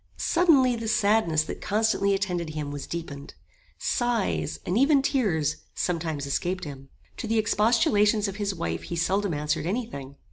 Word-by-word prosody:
Suddenly 290 Hz, -8 st, +4 dB
the 225 Hz, -1 st, -5 dB
sadness 205 Hz, -7 st, +2 dB
that -, -, -7 dB
constantly 205 Hz, -2 st, +1 dB
attended 175 Hz, -5 st, -2 dB
him 150 Hz, -2 st, -3 dB
was 145 Hz, -1 st, -6 dB
deepened. 145 Hz, -4 st, -7 dB, 0.4 s
Sighs, 235 Hz, -, -1 dB
and 180 Hz, -, -1 dB
even 275 Hz, +3 st, +4 dB
tears, 165 Hz, -, +1 dB, 0.2 s
sometimes 160 Hz, -5 st, -2 dB
escaped 180 Hz, +6 st, -2 dB
him. 135 Hz, -2 st, -8 dB, 0.3 s
To 230 Hz, -, -4 dB
the 225 Hz, +1 st, +1 dB
expostulations 210 Hz, -1 st, +3 dB
of 195 Hz, 0 st, -5 dB
his 200 Hz, -2 st, -2 dB
wife 80 Hz, -, -3 dB
he 85 Hz, -, -6 dB
seldom 190 Hz, +1 st, 0 dB
answered 150 Hz, +2 st, -1 dB
any 230 Hz, +6 st, -1 dB
thing. 140 Hz, -, -9 dB
195 Hz, 155 wpm, -26 LUFS, 155-225 Hz, 0.4 s, Suddenly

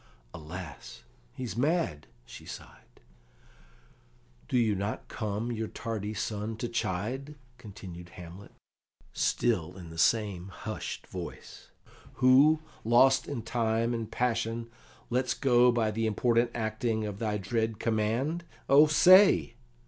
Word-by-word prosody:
"Alas, 80 Hz, -3 st, -9 dB, 0.3 s
he's 120 Hz, -7 st, -6 dB
mad!" 145 Hz, -, 0 dB, 0.2 s
she -, -, -11 dB
sighed. -, -, -12 dB, 1.5 s
"Do -, -, 0 dB
you 115 Hz, -3 st, +3 dB
not 100 Hz, +2 st, -3 dB
come 110 Hz, +2 st, -3 dB
your 110 Hz, -1 st, -3 dB
tardy 110 Hz, -2 st, -5 dB
son 105 Hz, +3 st, -3 dB
to 120 Hz, -, -3 dB
chide?" 120 Hz, +6 st, -3 dB, 0.2 s
continued 95 Hz, -6 st, -10 dB
Hamlet, 90 Hz, +3 st, -11 dB, 0.6 s
still 90 Hz, -7 st, 0 dB
in 85 Hz, -3 st, -10 dB
the 80 Hz, -, -8 dB
same 100 Hz, -2 st, +1 dB
hushed 105 Hz, +3 st, -6 dB
voice, -, -, -9 dB, 0.4 s
"who, 140 Hz, +5 st, +5 dB, 0.2 s
lost 120 Hz, +4 st, +4 dB
in 130 Hz, -6 st, -4 dB
time 115 Hz, 0 st, 0 dB
and 115 Hz, -2 st, -3 dB
passion, 115 Hz, -1 st, -1 dB, 0.4 s
lets 125 Hz, +1 st, +1 dB
go 125 Hz, -2 st, +4 dB
by 115 Hz, -2 st, +1 dB
the 115 Hz, +1 st, -1 dB
important 115 Hz, +2 st, +2 dB
acting 110 Hz, 0 st, -1 dB
of 105 Hz, -1 st, -5 dB
thy 105 Hz, -2 st, -1 dB
dread 110 Hz, +2 st, -1 dB
command? 115 Hz, +10 st, -1 dB, 0.2 s
Oh, 145 Hz, +3 st, +7 dB
say!" 185 Hz, -, +6 dB
115 Hz, 120 wpm, -29 LUFS, 105-120 Hz, 1.5 s, Oh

